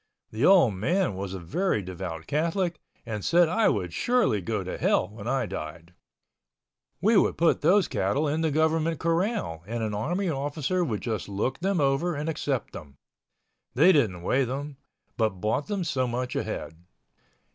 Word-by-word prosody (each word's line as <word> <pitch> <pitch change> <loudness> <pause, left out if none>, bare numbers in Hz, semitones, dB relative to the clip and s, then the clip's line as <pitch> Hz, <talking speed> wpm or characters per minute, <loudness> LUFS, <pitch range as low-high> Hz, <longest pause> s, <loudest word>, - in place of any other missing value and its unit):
The 110 +4 -3
old 170 - +6
man 170 - 0
was 95 0 -5
a - - -5
very 105 - -1
devout 90 -3 -6
Catholic 170 - -1 0.3
and 105 -3 -4
said 170 0 +4
I 220 +7 +3
would 90 -5 -2
surely 240 - +2
go 85 - -2
to - - -5
Hell 90 - +2
when 105 0 -9
I 130 -1 +1
died. 85 -1 -7 1.1
We 220 +5 +4
would - - +2
put 165 0 +3
those 200 +1 +4
cattle 120 +11 0
in 155 +3 0
the 160 - +1
government 160 +2 +1
corral 170 - -1
and 115 +1 -3
an 110 -1 -2
army 175 - -1
officer 150 +4 -1
would 110 -11 -2
just 110 -5 -3
look 105 +6 -2
them 190 0 0
over 140 +5 +1
and 150 +3 -3
accept 140 -6 -2
them. 70 -3 -10 0.8
They 160 +9 +6
didn't 105 - +1
weigh 135 +8 +2
them, 140 +3 -5 0.4
but 110 -5 0
bought 110 +8 -1
them 205 -3 -2
so 135 -6 0
much 125 +1 -3
a - - +1
head. 80 0 -6
135 Hz, 175 wpm, -27 LUFS, 105-170 Hz, 1.1 s, old